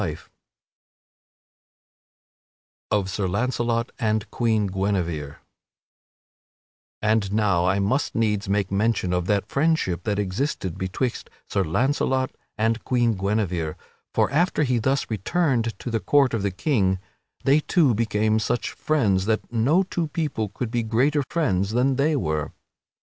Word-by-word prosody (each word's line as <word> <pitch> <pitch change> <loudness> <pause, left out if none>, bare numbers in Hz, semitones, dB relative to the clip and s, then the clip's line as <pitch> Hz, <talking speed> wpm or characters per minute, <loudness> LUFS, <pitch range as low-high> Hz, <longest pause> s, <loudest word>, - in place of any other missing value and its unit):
[Sidenote: - - -4 2.6
Of 100 -2 +1
Sir 95 -1 -1
Launcelot 120 +3 -1
and 110 -2 0
Queen 110 -3 +1
Guinevere] 90 -7 -2 1.7
And 105 -2 +2
now 100 -5 +2
I 95 +2 +2
must 115 +9 0
needs 105 -3 0
make 100 -1 0
mention 100 -2 +1
of 90 0 -1
that 100 -1 +1
friendship 140 - +1
that 105 -2 0
existed 100 - -2
betwixt 95 +7 -3 0.2
Sir - - 0
Launcelot 130 - 0 0.3
and 115 0 0
Queen 120 -2 +2
Guinevere, 95 -5 -1 0.4
for - - +1
after 165 +1 +2
he 125 -4 +1
thus 135 +5 0
returned 115 - 0
to 120 - -6
the 115 - +1
court 135 +6 +3
of 115 - 0
the 100 - 0
king, 95 - +1 0.5
they 140 +3 +4
two 155 -4 +3
became 110 0 +1
such 120 +2 -1
friends 105 -12 +1
that 110 +2 -1
no 140 +12 +3
two 175 -3 -2
people 150 - -2
could 110 +3 -5
be 120 -1 0
greater 130 +7 +2
friends 100 - 0
than 130 +2 +2
they 150 +3 +2
were. 75 - -1
110 Hz, 135 wpm, -24 LUFS, 100-130 Hz, 2.6 s, they